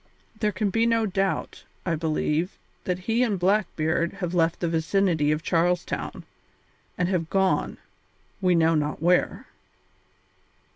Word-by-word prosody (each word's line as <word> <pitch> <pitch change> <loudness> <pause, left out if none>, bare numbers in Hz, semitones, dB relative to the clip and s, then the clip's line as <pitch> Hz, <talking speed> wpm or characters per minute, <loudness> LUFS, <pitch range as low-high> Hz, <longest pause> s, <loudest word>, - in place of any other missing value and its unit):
There 210 -2 +1
can 200 +1 -1
be 225 +3 +2
no 230 -1 +2
doubt, 195 -1 -2 0.2
I 175 - 0
believe, 160 +2 -1 0.3
that 180 -1 0
he 230 +2 +1
and 220 -6 +1
Blackbeard 175 -4 +1
have 180 -3 -4
left 165 -1 +2
the 175 - -1
vicinity 165 -1 +1
of 155 +1 -1
Charles 175 +1 +1
Town, - - -5 0.7
and 180 - +1
have 175 -4 -1
gone, 190 -1 +1 0.6
we 180 -2 +3
know 165 0 +4
not 150 -1 -1
where." 175 +3 +1
180 Hz, 140 wpm, -25 LUFS, 165-195 Hz, 0.7 s, know